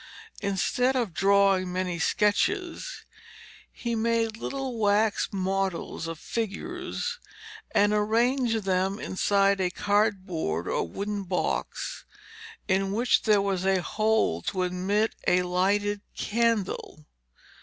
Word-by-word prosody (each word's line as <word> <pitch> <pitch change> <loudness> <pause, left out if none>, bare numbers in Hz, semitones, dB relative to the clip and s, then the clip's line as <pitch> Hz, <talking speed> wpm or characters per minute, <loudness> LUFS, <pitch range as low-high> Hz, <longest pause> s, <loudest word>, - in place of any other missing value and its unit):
Instead 210 +6 +1
of 235 -9 -1
drawing 195 -1 +3
many 180 -1 -2
sketches, 350 - 0 0.7
he 235 -1 -4
made 230 0 +1
little 260 0 -4
wax 210 0 +2
models 190 -3 -2
of 165 0 -5
figures 340 - -4 0.5
and 205 +1 +3
arranged 225 +2 +2
them 190 +1 0
inside 200 0 +1
a 180 - +1
cardboard 185 - 0
or - - -1
wooden 205 - -3
box 180 -1 -2 0.6
in 195 0 +1
which 235 +5 +2
there 210 -3 +3
was 195 -2 -1
a 190 -2 +2
hole 215 - +1
to 185 - -1
admit 190 +4 0
a 180 0 +4
lighted 200 +3 +1 0.2
candle. 215 -8 -1
200 Hz, 110 wpm, -27 LUFS, 185-225 Hz, 0.7 s, a